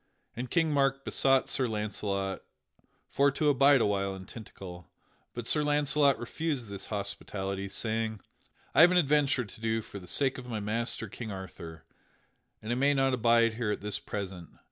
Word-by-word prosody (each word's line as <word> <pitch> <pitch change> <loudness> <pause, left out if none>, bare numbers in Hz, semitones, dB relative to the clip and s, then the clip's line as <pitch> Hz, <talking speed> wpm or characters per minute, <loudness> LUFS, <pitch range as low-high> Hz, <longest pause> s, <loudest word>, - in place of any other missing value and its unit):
And 125 +2 -5
King 165 -2 +2
Mark 135 -1 +1
besought 135 -1 +3
Sir 130 -3 0
Launcelot 100 -3 -2 0.7
for 140 +1 +3
to 145 +2 +1
abide 140 -1 +5
a - - +3
while 100 -1 0
in 95 0 -9
Tintagel; 95 -6 -10 0.5
but 120 -1 -5
Sir 150 +5 +1
Launcelot 145 -1 +3
refused 130 -1 -3
this 100 -1 -7
hospitality, 100 -1 -4
saying: 110 0 -2 0.5
"I - - +6
have 170 - +9
an 180 - +3
adventure 145 -5 +3
to 105 +2 -14
do 115 0 0
for 100 - -9
the 90 - -13
sake 135 +4 +2
of 125 - -10
my 115 -3 -3
master, 115 +2 -1
King 110 +2 -7
Arthur, 85 -4 -9 0.8
and 110 - -3
I - - +1
may 140 +2 +3
not 135 -1 +2
abide 115 -1 +4
here 115 -1 -2
at 105 - -2
this 105 -1 -2
present. 95 -4 -6
115 Hz, 175 wpm, -30 LUFS, 100-135 Hz, 0.8 s, have